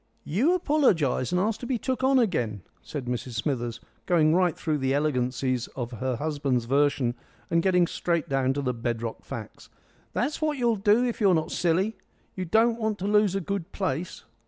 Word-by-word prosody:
"You 255 - +2
apologise 215 - +2
and 180 - +2
ask 215 +3 0
to 245 - -6
be 260 - 0
took 260 +3 -2
on 265 0 +4
again," 120 - 0 0.2
said 145 -4 -6
Mrs 125 0 -4
Smithers, 120 0 -2 0.3
going 160 -3 +4
right 180 -1 +2
through 155 -2 -1
the 135 0 +1
elegancies 130 -3 0
of 120 -2 -4
her 125 +2 -2
husband's 140 -3 -1
version 135 -1 +2 0.4
and 170 - +3
getting 180 -1 +3
straight 170 -1 -1
down 135 -2 +1
to 140 +1 -3
the 125 -1 0
bedrock 115 -1 -4
facts. - - -8 0.4
"That's 285 +6 -1
what 305 -2 0
you'll 235 -3 +2
do 210 +4 +3
if 240 -2 -3
you're 195 -4 +5
not 160 - -1
silly. 185 +5 +1 0.4
You 185 - -3
don't 225 +6 +3
want 220 -2 -1
to 190 - -5
lose 210 -2 +3
a 195 - 0
good 195 -1 -4
place." 180 -3 -3
165 Hz, 185 wpm, -26 LUFS, 130-210 Hz, 0.4 s, you're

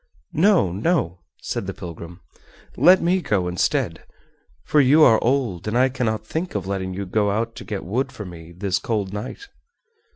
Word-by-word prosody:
"No, 170 - +3
no," 95 - 0 0.2
said - - -3
the - - -5
pilgrim, 85 +1 -9 0.5
"let 180 +7 +6
me 180 +2 +2
go 95 - 0
instead, 90 -1 -1 0.6
for 150 - +3
you 145 +4 +6
are 115 -6 +5
old, 120 -8 0
and 110 +3 0
I 130 +1 +4
cannot 115 -5 -2
think 170 -2 -4
of 100 -3 -2
letting 95 -1 -3
you 100 +1 -4
go 105 +2 +1
out 115 +3 -1
to - - -7
get 105 -3 -5
wood 130 +9 -1
for 110 -6 -8
me 85 -2 -10
this 95 +1 -1
cold 105 -4 -2
night!" 105 - -6
105 Hz, 175 wpm, -22 LUFS, 95-135 Hz, 0.6 s, let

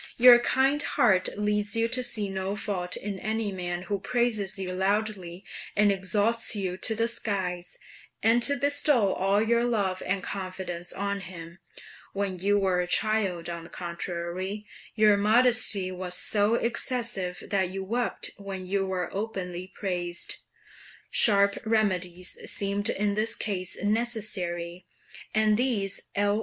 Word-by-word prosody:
"Your 245 0 +9
kind 270 +4 +2
heart 190 -10 +2
leads 210 0 0
you 230 0 +2
to 255 +2 +1
see 230 -4 0
no 190 +1 -3
fault 180 -4 -3
in 200 -2 -5
any 220 0 -2
man 175 -1 -4
who 200 +1 -2
praises 215 -2 0
you 190 -1 -4
loudly 190 -2 -2 0.3
and 205 0 +4
exalts 210 +4 0
you 190 -3 -2
to 220 - 0
the 230 +1 +1
skies, 190 -6 -2 0.5
and 230 +2 +4
to 285 +4 +4
bestow 285 -7 +3
all 195 +2 +1
your 235 +1 +2
love 200 -6 0
and 190 0 -1
confidence 185 -2 -4
on 200 +1 -2
him; 170 -1 -10 0.5
when 195 -2 -2
you 205 +3 +2
were 190 -2 +1
a 180 - -1
child, 195 -4 +1
on 170 -1 -5
the 170 - -12
contrary, 175 +3 -5 0.3
your 210 -2 +5
modesty 215 -3 +3
was 180 -1 -2
so 210 +2 +3
excessive 230 -6 -1
that 190 -3 +1
you 190 +1 -5
wept 235 +5 -1
when 195 -2 -7
you 195 +1 0
were 185 -2 -3
openly 185 -4 -4
praised." 175 -3 -2 0.7
Sharp 200 -2 +5
remedies 185 -5 0 0.2
seemed 200 0 0
in 205 0 0
this 215 +2 +1
case 185 -4 -2
necessary, 205 -6 -1 0.5
and 215 -1 +3
these 220 -6 0
L. 205 +1 +2
200 Hz, 145 wpm, -27 LUFS, 185-220 Hz, 0.7 s, Your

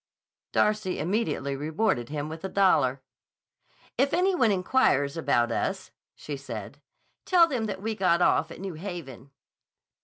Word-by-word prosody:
Darcy 210 -3 +1
immediately 175 -8 -1
rewarded 155 - -1
him 145 0 -3
with 160 +2 -8
a 190 - -3
dollar. 140 -10 +2 1.0
"If 275 +2 +3
any 375 +2 +2
one 250 -10 +3
inquires 185 - +2
about 120 -7 +1
us," - - -2 0.2
she 145 -2 -6
said, 130 0 -8 0.4
"tell 355 -3 +5
them 250 -8 -2
that 195 -2 -5
we 220 0 -1
got 180 -5 +2
off 165 -2 +2
at - - -10
New 190 -1 -5
Haven." 155 -7 -8
170 Hz, 145 wpm, -27 LUFS, 140-215 Hz, 1.0 s, tell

